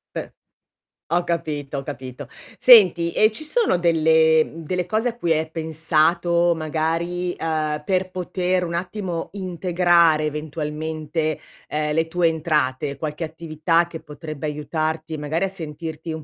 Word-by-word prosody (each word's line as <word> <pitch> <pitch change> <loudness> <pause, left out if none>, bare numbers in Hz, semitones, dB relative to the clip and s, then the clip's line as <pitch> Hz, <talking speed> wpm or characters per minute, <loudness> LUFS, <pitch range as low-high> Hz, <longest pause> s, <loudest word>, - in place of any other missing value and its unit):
Eh. - - -5 0.8
Ho 175 +1 +1
capito, 150 -5 -3
ho 135 - -4
capito. 130 -3 -7 0.3
Senti, 180 -8 +7
e 215 +1 +4
ci 265 - -6
sono 425 - +1
delle 160 -2 +4
mhmm, 165 +1 -10
delle 180 +2 -2
cose 220 +5 +1
a 230 - -7
cui 170 -7 -1
hai 160 0 +1
pensato, 165 +2 +2
magari, 165 +3 -2
uhm, 155 -2 -2
per 185 -1 0
poter 180 0 -1
un 170 -1 -4
attimo 180 -1 -3
integrare 175 -4 +2
eventualmente, 155 +1 -3 0.3
ehm, 150 0 -1
le 160 +1 +1
tue 170 0 +2
entrate, 150 -4 -1
qualche 155 +2 -4
attività 165 +1 0
che 165 -1 -8
potrebbe 155 -1 -7
aiutarti, 155 +1 -3
magari 150 +4 -2
a 195 - +1
sentirti 160 -2 -6
un 160 -1 -6
160 Hz, 140 wpm, -22 LUFS, 155-175 Hz, 0.8 s, Senti